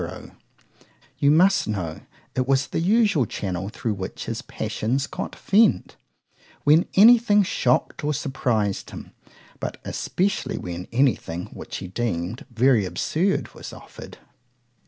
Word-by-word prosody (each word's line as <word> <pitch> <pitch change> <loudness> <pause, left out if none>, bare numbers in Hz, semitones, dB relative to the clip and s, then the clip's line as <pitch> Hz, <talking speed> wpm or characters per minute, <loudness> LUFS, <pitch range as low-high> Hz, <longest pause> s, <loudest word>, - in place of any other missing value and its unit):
_——You 140 - +5
must 185 +6 +4
know 90 -7 -3 0.3
it 130 0 0
was 135 0 +2
the - - -3
usual 195 - +3
channel 95 -1 -4
thro' 110 0 -3
which 95 -2 -6
his - - -4
passions 130 +6 -2
got - - -6
vent, 200 - +2 0.7
when 155 +4 +5
any 230 +5 +8
thing 210 -3 +3
shocked 130 -8 0
or 150 - +1
surprized 120 -8 -1
him:——but - - -10
especially 195 +2 -1
when 90 0 -6
any 130 +1 +4
thing, 85 0 -7
which - - -7
he - - -6
deem'd 100 +1 -3
very 120 -2 +3
absurd, 155 - -1
was - - -9
offered. - - -12
130 Hz, 130 wpm, -24 LUFS, -, 0.7 s, any